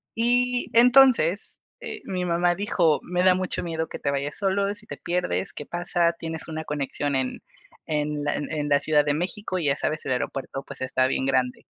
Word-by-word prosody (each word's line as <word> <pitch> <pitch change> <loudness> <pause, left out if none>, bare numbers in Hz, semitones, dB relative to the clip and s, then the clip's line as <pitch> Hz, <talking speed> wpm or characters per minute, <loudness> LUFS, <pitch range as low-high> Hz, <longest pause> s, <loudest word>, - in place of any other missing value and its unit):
y 245 +2 +4
entonces, 235 -6 +4 0.2
eh, 440 -3 -6
mi 185 -1 -3
mamá 175 0 +1
dijo: 175 -5 +1
"Me 180 0 -1
da 185 -1 +6
mucho 185 0 -2
miedo 160 -1 -3
que - - -7
te - - -1
vayas 140 +1 -3
solo, 200 0 0
si 210 - -12
te - - -6
pierdes, 170 - -2
¿qué 150 - -8
pasa?, 175 -1 0
tienes 160 -1 -6
una 160 -1 -5
conexión 145 -1 -2
en 130 -1 -3 0.5
en 150 -1 -2
la 145 - 0
en 150 0 -3
la 145 0 +4
Ciudad 150 -1 +2
de 145 - 0
México 185 +2 -3
y 160 - -3
ya 140 - +2
sabes, 155 +2 -3
el 130 - 0
aeropuerto 135 +2 -4
pues - - -9
está 130 0 +1
bien 130 - -1
grande". 130 -2 0
165 Hz, 200 wpm, -25 LUFS, 145-190 Hz, 0.5 s, da